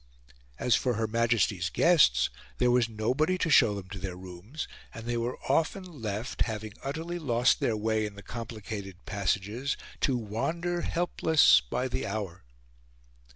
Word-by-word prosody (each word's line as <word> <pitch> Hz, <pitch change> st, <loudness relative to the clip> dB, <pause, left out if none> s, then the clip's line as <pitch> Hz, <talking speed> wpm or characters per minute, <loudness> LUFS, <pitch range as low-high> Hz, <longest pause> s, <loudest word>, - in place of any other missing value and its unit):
As 125 Hz, -, +3 dB
for 125 Hz, -3 st, +1 dB
Her 110 Hz, +1 st, 0 dB
Majesty's 110 Hz, -5 st, +1 dB
guests, 95 Hz, -, +4 dB, 0.3 s
there 125 Hz, -1 st, +3 dB
was 120 Hz, -2 st, +3 dB
nobody 130 Hz, +11 st, +1 dB
to 165 Hz, -3 st, 0 dB
show 115 Hz, -7 st, +6 dB
them 100 Hz, -2 st, -7 dB
to 100 Hz, -1 st, -6 dB
their 95 Hz, -1 st, -4 dB
rooms, 95 Hz, -, -7 dB, 0.3 s
and 115 Hz, -, -8 dB
they 120 Hz, 0 st, -1 dB
were 120 Hz, +1 st, -2 dB
often 160 Hz, +7 st, +1 dB
left, 115 Hz, -, -5 dB
having 110 Hz, -2 st, -2 dB
utterly 165 Hz, +5 st, -4 dB
lost 125 Hz, -5 st, +2 dB
their 110 Hz, -, +1 dB
way 110 Hz, 0 st, 0 dB
in 100 Hz, -, -10 dB
the 100 Hz, -, -11 dB
complicated 105 Hz, -4 st, -7 dB
passages, 105 Hz, +7 st, -1 dB, 0.2 s
to 130 Hz, -3 st, +2 dB
wander 165 Hz, -, -2 dB
helpless 165 Hz, -3 st, +4 dB
by -, -, -1 dB
the 65 Hz, +1 st, -3 dB
hour. 100 Hz, -4 st, -4 dB
115 Hz, 155 wpm, -29 LUFS, 100-135 Hz, 0.3 s, show